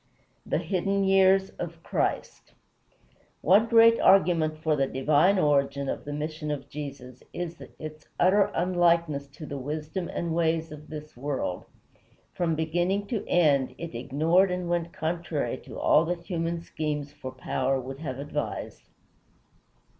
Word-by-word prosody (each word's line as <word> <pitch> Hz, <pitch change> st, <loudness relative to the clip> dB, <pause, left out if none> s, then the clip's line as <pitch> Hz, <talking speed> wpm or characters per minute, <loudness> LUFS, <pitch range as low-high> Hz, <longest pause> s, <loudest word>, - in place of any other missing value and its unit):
VII -, -, -26 dB
THE -, -, +2 dB
HIDDEN 195 Hz, +1 st, 0 dB
YEARS 190 Hz, 0 st, +4 dB
OF 165 Hz, -1 st, -6 dB
CHRIST -, -, -2 dB, 0.9 s
One 205 Hz, +6 st, +5 dB
great 230 Hz, 0 st, +6 dB
argument 165 Hz, -5 st, +4 dB
for 155 Hz, -1 st, +1 dB
the 135 Hz, -2 st, +1 dB
divine 150 Hz, +9 st, +3 dB
origin 140 Hz, -3 st, +2 dB
of -, -, -4 dB
the 145 Hz, -, -5 dB
mission 150 Hz, +1 st, -4 dB
of 145 Hz, -2 st, -4 dB
Jesus 135 Hz, -4 st, -8 dB
is 175 Hz, -1 st, -5 dB, 0.2 s
its 155 Hz, -1 st, -9 dB
utter 195 Hz, +3 st, +4 dB
unlikeness 170 Hz, -5 st, +2 dB
to 145 Hz, +3 st, -10 dB
the 140 Hz, -1 st, -5 dB
wisdom 155 Hz, +6 st, -4 dB
and 170 Hz, -1 st, -3 dB
ways 165 Hz, -1 st, 0 dB
of 150 Hz, 0 st, -11 dB
this 150 Hz, 0 st, -8 dB
world. 130 Hz, -8 st, -3 dB, 0.7 s
From 165 Hz, -2 st, 0 dB
beginning 175 Hz, +5 st, 0 dB
to 230 Hz, -4 st, -2 dB
end, 145 Hz, -6 st, +3 dB
it 170 Hz, -4 st, -7 dB
ignored 160 Hz, +10 st, +2 dB
and 180 Hz, -1 st, -2 dB
went 170 Hz, -1 st, -1 dB
contrary 165 Hz, -2 st, -2 dB
to -, -, -9 dB
all 155 Hz, -, +4 dB
that 175 Hz, 0 st, -3 dB
human 170 Hz, -1 st, -2 dB
schemes 150 Hz, -3 st, -4 dB
for 145 Hz, -3 st, -7 dB
power 130 Hz, +1 st, -1 dB
would 135 Hz, +2 st, -7 dB
have 130 Hz, -5 st, -5 dB
advised. 140 Hz, +2 st, -5 dB
160 Hz, 145 wpm, -27 LUFS, 145-175 Hz, 0.9 s, great